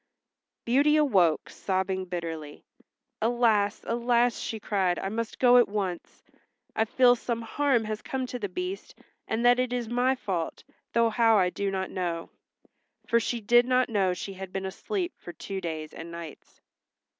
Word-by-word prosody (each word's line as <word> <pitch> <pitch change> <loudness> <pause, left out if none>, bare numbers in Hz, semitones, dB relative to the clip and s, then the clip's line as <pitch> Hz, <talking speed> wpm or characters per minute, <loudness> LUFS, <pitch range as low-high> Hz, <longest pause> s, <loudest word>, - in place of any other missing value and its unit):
Beauty 280 +5 +4
awoke, 195 - +3
sobbing 190 0 -2
bitterly. 165 -4 -6 0.6
"Alas, 220 -3 +2
alas!" 240 0 +1
she 220 - -4
cried. 190 -4 0
"I 195 - -3
must 225 +1 -4
go 250 -1 +6
at 245 - +6
once. 195 -4 -4 0.5
I 220 - +2
feel 245 +2 +5
some 230 -1 -3
harm 265 0 +1
has 215 0 -4
come 265 -1 -3
to 250 0 -6
the 205 -3 -3
Beast, 365 - -5 0.3
and 225 +2 -1
that 245 +1 +6
it 255 -1 0
is 245 -2 -2
my 245 +3 +2
fault, 180 -9 -4 0.3
though 230 -1 +3
how 225 -1 +4
I 180 -2 +3
do 200 +1 -2
not 190 -1 -3
know." 170 -3 -3 0.7
For 235 - +3
she 235 +1 -2
did 240 +3 +4
not 255 -1 +2
know 195 -5 +1
she 195 +2 -6
had 190 -1 -8
been 195 0 -3
asleep 350 - -3
for 175 - -9
two 195 +1 -6
days 155 -3 -5
and 165 - -8
nights. 170 -2 -10
220 Hz, 170 wpm, -27 LUFS, 185-245 Hz, 0.7 s, go